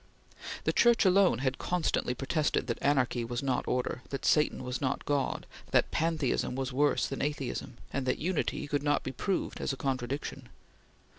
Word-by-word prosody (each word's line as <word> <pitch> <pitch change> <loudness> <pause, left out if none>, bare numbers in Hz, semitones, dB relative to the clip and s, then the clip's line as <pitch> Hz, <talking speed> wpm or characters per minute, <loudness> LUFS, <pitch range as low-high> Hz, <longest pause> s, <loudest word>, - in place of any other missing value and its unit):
The - - +1
Church 235 -2 +5
alone 185 -6 +5
had 130 0 0
constantly 165 -7 0
protested 145 +4 0
that - - -3
anarchy 130 -4 +2
was 120 +2 -3
not 130 -2 0
order, 125 0 -1
that 135 -1 -4
Satan 150 -3 +3
was 125 0 -3
not 135 0 -1
God, 140 -2 0 0.2
that - - +3
pantheism 155 -6 0
was 135 0 -3
worse 145 +2 +3
than 135 - -4
atheism, 135 -4 -3 0.2
and 135 -2 -2
that - - +2
Unity 175 +1 -1
could 145 -1 -1
not 145 0 +1
be 130 - -3
proved 185 +9 -2
as - - 0
a - - -6
contradiction. 130 0 -3
140 Hz, 170 wpm, -30 LUFS, 125-150 Hz, 0.2 s, Church